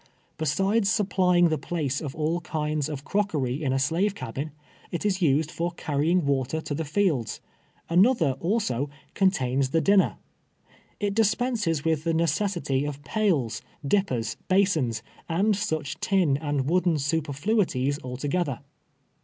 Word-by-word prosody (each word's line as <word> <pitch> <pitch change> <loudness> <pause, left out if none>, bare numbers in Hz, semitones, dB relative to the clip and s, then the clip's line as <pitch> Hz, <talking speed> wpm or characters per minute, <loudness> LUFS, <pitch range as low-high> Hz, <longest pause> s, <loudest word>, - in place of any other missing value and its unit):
Besides 195 +8 +2
supplying 185 -5 +3
the 155 -2 0
place 145 -3 -2
of 145 -4 -5
all 160 +3 -1
kinds 150 -2 -2
of 145 -2 -5
crockery 155 -10 -1
in 135 - +1
a 135 - +1
slave 165 +9 +1
cabin, 135 - -5 0.4
it 175 - -4
is 195 -2 +1
used 155 0 +2
for 170 +1 -1
carrying 160 +2 0
water 140 +2 0
to 155 - -4
the 160 +3 -2
fields. 150 - 0 0.5
Another, 180 - +4
also, 155 - 0 0.2
contains 135 -9 +1
the 165 - +2
din 200 +4 +5
ner. - - +1 0.8
It 205 -1 0
dispenses 215 - +1
with 160 -2 +1
tlie 165 -1 0
necessity 170 -5 0
of 145 -1 -5
pails, 150 - 0 0.3
dippers, 135 - 0
basins, 160 - +2 0.3
and 200 +6 +2
such 160 -9 -3
tin 185 -8 +2
and 145 -2 -1
wooden 175 0 +2
superfluities 145 - 0
alto 130 +3 -4
gether. 145 -5 -1
160 Hz, 140 wpm, -26 LUFS, 140-190 Hz, 0.8 s, din